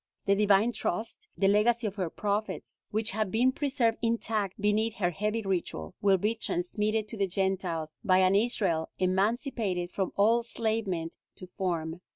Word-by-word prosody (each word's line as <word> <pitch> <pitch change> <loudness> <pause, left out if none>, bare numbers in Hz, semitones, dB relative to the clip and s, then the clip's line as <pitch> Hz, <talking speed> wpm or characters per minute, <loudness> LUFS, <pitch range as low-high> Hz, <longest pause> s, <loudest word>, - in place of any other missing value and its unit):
The 200 - +4
divine 205 +2 +4
trust, 225 0 -3
the 195 +2 +3
legacy 225 +4 +3
of 205 - -1
her 185 -4 -1
prophets, 205 +4 -3
which 220 +1 0
has 215 +1 0
been 235 +6 +3
preserved 260 -5 0
intact 225 -4 -1
beneath 210 +2 +1
her 175 -3 0
heavy 210 +5 -2
ritual, 175 - -3
will 195 -1 +4
be 210 +5 +1
transmitted 215 +1 -1
to 225 - -6
the 200 -1 +1
Gentiles 180 -4 -2
by 185 -4 +4
an 185 0 +4
Israel 200 -7 +1
emancipated 190 -1 0
from 190 -2 -2
all 220 +4 +4
enslavement 220 -8 -2 0.2
to 185 - -9
form. 175 -3 -3
205 Hz, 160 wpm, -29 LUFS, 185-225 Hz, 0.2 s, The